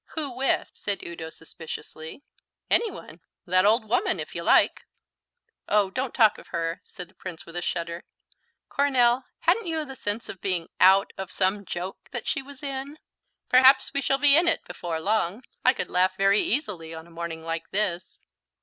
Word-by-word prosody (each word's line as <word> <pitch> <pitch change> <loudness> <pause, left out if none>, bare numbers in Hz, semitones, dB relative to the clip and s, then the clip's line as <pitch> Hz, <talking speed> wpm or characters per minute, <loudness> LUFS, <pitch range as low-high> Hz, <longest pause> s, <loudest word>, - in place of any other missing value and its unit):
"Who 300 -4 -3
with?" 260 +2 0
said 200 -1 -3
Udo 165 -1 -7
suspiciously. 160 - -9 0.5
"Any 460 - +4
one - - -11 0.2
that 185 +1 +3
old 220 +1 +3
woman, 365 - +1
if - - -6
you - - -4
like." - - +3 0.8
"Oh, 205 -2 +3
don't 255 +3 -2
talk 220 -4 +4
of - - -15
her," 165 +1 -3
said 180 -4 -9
the - - -25
Prince 180 -3 -8
with 165 - -12
a 175 - -2
shudder. 170 0 -3 0.6
"Coronel, 255 -3 +2 0.2
hadn't 455 -5 +2
you 325 -1 -1
a 280 -4 -6
sense 210 -2 -2
of 190 - -9
being 180 -4 -1
out 190 +2 +5
of 190 -2 -5
some 195 +1 0
joke 180 +2 -6
that 240 -3 -5
she - - -1
was 275 +1 -13
in?" 275 +1 -5 0.5
"Perhaps 265 +2 +6
we 280 - 0
shall 270 0 +2
be 280 0 +6
in 340 +3 +4
it 335 - +1
before 165 -2 -4
long. 210 +4 0 0.2
I 255 - +6
could - - -5
laugh 185 +1 +2
very 195 +1 +4
easily 190 - -2
on 160 0 -9
a 170 - -18
morning 165 -1 -6
like 165 0 -4
this." 185 -4 -2
205 Hz, 185 wpm, -26 LUFS, 170-265 Hz, 0.8 s, Perhaps